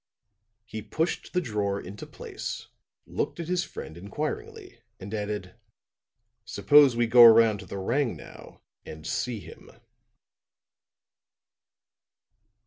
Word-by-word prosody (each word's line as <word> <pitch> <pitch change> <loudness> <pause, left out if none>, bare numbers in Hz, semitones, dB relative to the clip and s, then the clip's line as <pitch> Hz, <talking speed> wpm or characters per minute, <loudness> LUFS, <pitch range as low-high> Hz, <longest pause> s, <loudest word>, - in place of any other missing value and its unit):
He 110 -1 -6
pushed 160 +9 -2
the 180 - +1
drawer 105 - -1
into 100 +3 -9
place, - - -7 0.4
looked - - -3
at 170 - -4
his 180 0 0
friend 80 - -8
inquiringly, 115 - -6 0.2
and 100 +3 -8
added: 105 -3 -4 0.9
"Suppose 135 +3 +5
we 120 0 +2
go 120 +1 +8
around 115 -2 +7
to 95 - -10
the 100 - -7
'Rangnow' 120 +6 -3 0.2
and 80 0 -10
see 120 +7 -2
him?" 80 - -13
110 Hz, 110 wpm, -27 LUFS, 100-135 Hz, 0.9 s, go